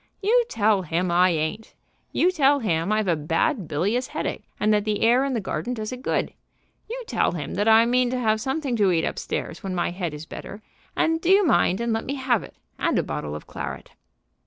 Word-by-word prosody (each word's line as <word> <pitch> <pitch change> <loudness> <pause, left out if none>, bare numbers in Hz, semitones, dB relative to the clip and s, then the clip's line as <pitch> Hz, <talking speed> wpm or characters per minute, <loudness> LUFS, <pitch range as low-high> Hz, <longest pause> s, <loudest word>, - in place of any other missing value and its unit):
"You 465 +4 +3
tell 210 -2 +2
him 175 +1 -1
I 180 +2 +5
ain't. 165 +6 -3 0.4
You 360 - +3
tell 285 -5 +4
him 185 -6 0
I've 215 -1 +1
a 170 - +3
bad 165 - 0
bilious 200 - 0
headache, - - -4
and 215 +1 +3
that 210 -1 +2
the 210 -1 -1
air 240 +4 +4
in 275 -1 -1
the - - 0
garden 240 +4 -3
does 215 0 -5
it 255 0 -7
good. - - -1 0.6
You - - -5
tell - - 0
him 150 -4 -5
that 205 +3 0
I 225 +1 +7
mean 250 +1 +2
to 255 - -1
have 220 -3 +1
something 265 0 -1
to 200 -3 +3
eat 165 -2 +1
up - - -3
stairs - - -4
when 190 -1 -4
my 175 -1 0
head 175 -4 -4
is 150 +2 -8
better; 205 +5 -9 0.3
and 325 0 +1
do 340 - -1
you 390 +1 +6
mind 195 - +3
and 235 -1 0
let 225 - -2
me 275 - -3
have 260 -5 +1
it, - - -12 0.2
and - - +1
a - - +2
bottle 75 0 -4
of 75 - -8
claret." - - -7
215 Hz, 230 wpm, -24 LUFS, 180-255 Hz, 0.6 s, I